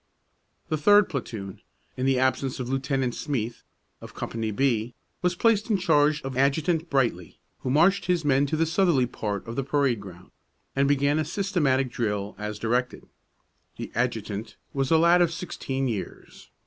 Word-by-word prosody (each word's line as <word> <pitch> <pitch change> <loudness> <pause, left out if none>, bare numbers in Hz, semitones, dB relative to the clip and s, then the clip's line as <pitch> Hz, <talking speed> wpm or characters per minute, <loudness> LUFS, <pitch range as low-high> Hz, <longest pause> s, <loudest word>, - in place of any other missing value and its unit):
The 155 - -1
third 205 +5 +5
platoon, 110 - -6 0.3
in 130 +1 -1
the 135 -1 +3
absence 130 0 0
of 125 - -3
Lieutenant 135 -1 -1
Smeath, 120 -6 -3 0.4
of - - -11
Company 115 -1 -3
B, 115 0 0 0.3
was 180 0 +1
placed 220 +2 +2
in 210 - +3
charge 150 -4 +2
of 135 -1 -5
Adjutant 155 +5 +1
Brightly, 120 - 0 0.2
who - - -4
marched 175 +8 +3
his 175 -3 +1
men 140 0 +3
to 155 - -1
the 165 - +2
southerly 165 -6 +2
part 105 -4 -4
of 115 - -5
the 135 - -1
parade 135 -4 +1
ground, 90 -2 -12 0.4
and 140 0 +3
began 145 +1 +2
a - - +1
systematic 150 - 0
drill, 105 -3 -2
as 105 0 -4
directed. 120 +3 -1 0.7
The - - -6
adjutant 110 -3 -2 0.2
was 135 -1 -1
a 160 - +5
lad 170 +2 +5
of 170 -2 +3
sixteen 135 -6 -3
years. 110 -6 -6
135 Hz, 165 wpm, -26 LUFS, 120-160 Hz, 0.7 s, third